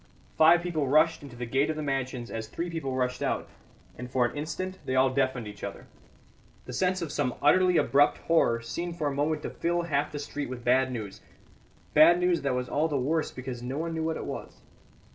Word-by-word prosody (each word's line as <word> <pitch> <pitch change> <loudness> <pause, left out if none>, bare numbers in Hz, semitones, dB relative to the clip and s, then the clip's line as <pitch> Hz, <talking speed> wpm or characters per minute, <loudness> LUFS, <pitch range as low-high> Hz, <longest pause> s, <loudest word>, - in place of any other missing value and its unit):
Five 170 +2 +6
people 160 -5 -1
rushed 155 +4 +3
into 140 -4 -11
the 120 0 -5
gate 135 +5 +1
of 155 - -1
the 155 - -4
mansions 130 -3 -3
as 110 -1 -4
three 170 +8 -4
people 140 -6 -3
rushed 125 -1 -1
out, - - -1 0.5
and 125 0 -7
for 125 -1 +2
an 120 - -3
instant 185 +5 -4
they 130 - -2
all 130 0 +4
deafened 130 -4 0
each 105 -1 -10
other. - - -6 0.8
The - - -8
sense 185 -1 0
of 160 - -5
some 130 -4 -1
utterly 185 -1 +4
abrupt 145 +1 +4
horror 120 -8 +2
seemed 170 +8 -5
for 155 - -2
a 145 - 0
moment 150 +2 -1
to - - -4
fill 170 +1 -1
half 150 -3 -1
the 150 - -5
street 145 -1 -5
with 125 -2 -7
bad 130 +1 +3
news 110 -5 -6 0.7
bad 170 +3 +7
news 180 -3 +2
that 135 -2 0
was 125 0 -2
all 150 +5 +1
the 150 -3 -1
worse 155 +5 0
because 130 -2 -7
no 130 +3 -4
one 165 +1 -2
knew 160 0 -2
what 160 0 -1
it - - -6
was. - - -7
145 Hz, 220 wpm, -28 LUFS, 125-165 Hz, 0.8 s, bad